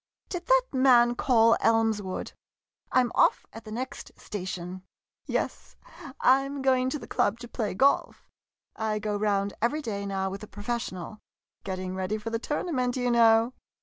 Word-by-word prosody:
Did 355 -1 -5
that - - +5
man 250 -2 +5
call 230 -2 +4
Elmswood? 220 -4 0 0.6
I 255 - +5
'm 240 -1 -1
off - - +3
at 225 - -10
the 215 - -9
next 255 +5 -6
station. 185 -2 -6 0.5
Yes, - - -3 0.4
I 265 +2 +5
'm 275 0 -5
going 260 -1 +3
to 300 - -2
the - - -10
club 210 - 0
to 240 - -7
play 215 -5 -3
golf. 275 +8 +1 0.5
I 220 -1 -1
go 210 0 -2
round 200 -1 0
every 295 +7 0
day 200 -4 -4
now 190 -1 -2
with 195 - -6
a 215 - -8
professional. 210 -3 -5 0.4
Getting 185 -1 -4
ready 190 +3 -2
for 220 +1 -6
the 230 - -1
tournament, 255 -3 -1
you 245 -1 +1
know. 230 +1 +5
225 Hz, 165 wpm, -27 LUFS, 205-255 Hz, 0.6 s, that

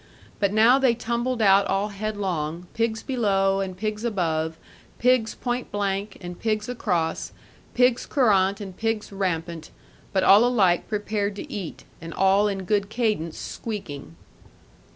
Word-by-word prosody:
But 200 -2 +2
now 225 +5 +5
they 260 -3 +3
tumbled 235 +1 -1
out 195 0 +5
all 195 +2 0
headlong, 190 -6 -3
pigs 225 -1 -1
below 195 -6 +1
and 190 -2 -4
pigs 215 +2 -3
above, 160 -7 -1 0.4
pigs 245 -3 +2
point 245 0 -3
blank 200 0 -2
and 175 -1 -8
pigs 215 -1 -1
across, 180 -9 -1 0.4
pigs 250 -1 +3
courant 200 -7 +3
and 195 -3 -8
pigs 225 -1 -2
rampant, 170 -4 -3 0.4
but 190 -1 +1
all 200 +4 +7
alike 200 -8 +2
prepared 205 -1 -2
to - - -8
eat, 190 -6 -6 0.2
and 165 -1 -8
all 195 +2 +4
in 195 -2 -3
good 200 +1 0
cadence 215 -9 -1
squeaking. 155 - -6
205 Hz, 140 wpm, -24 LUFS, 185-225 Hz, 0.4 s, all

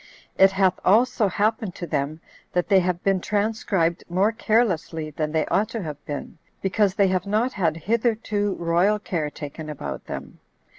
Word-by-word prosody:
It 195 0 +6
hath 190 -2 +2
also 225 +2 +4
happened 210 0 0
to 175 - -5
them, 150 0 -2 0.3
that 180 +1 0
they 195 -2 +6
have 180 -1 -1
been 195 -2 +2
transcribed 205 -5 0
more 190 +5 +2
carelessly 180 -9 0
than 150 0 -2
they 160 0 +1
ought 210 +1 +1
to 215 - -4
have 150 -3 -7
been, 145 +2 -6 0.2
because 195 0 +1
they 200 -2 +3
have 185 +1 -1
not 225 +5 +1
had 165 -6 0
hitherto 215 0 0
royal 175 +5 +2
care 170 -7 -2
taken 150 +1 -8
about 150 - -6
them. - - -7
190 Hz, 165 wpm, -24 LUFS, 165-210 Hz, 0.3 s, It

